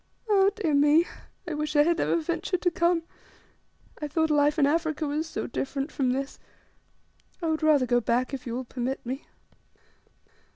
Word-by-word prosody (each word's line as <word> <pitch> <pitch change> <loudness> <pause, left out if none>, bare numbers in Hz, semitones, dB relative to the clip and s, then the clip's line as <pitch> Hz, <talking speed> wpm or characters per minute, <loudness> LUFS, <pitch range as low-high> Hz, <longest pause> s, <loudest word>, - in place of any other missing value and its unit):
"Ah, 395 -2 +5
dear 345 -8 -1
me; 295 +4 +5 0.4
I 340 - -3
wish 300 +1 -3
I 295 - +6
had 340 +2 +1
never - - +1
ventured 340 +3 -2
to 355 - +3
come! 340 -1 +1 1.0
I 300 - -2
thought 320 +2 0
life 295 +1 +3
in 290 - +4
Africa 315 +1 0
was 300 +2 -2
so - - -4
different 275 +4 -3
from 265 -3 0
this. 270 +2 -3 1.0
I 345 - -4
would 315 0 0
rather 305 -4 +4
go 245 0 +2
back 245 +4 0
if 260 -2 -5
you 235 - -3
will 255 +1 -4
permit 255 +2 -4
me." 260 +4 -5
300 Hz, 175 wpm, -27 LUFS, 270-330 Hz, 1.0 s, I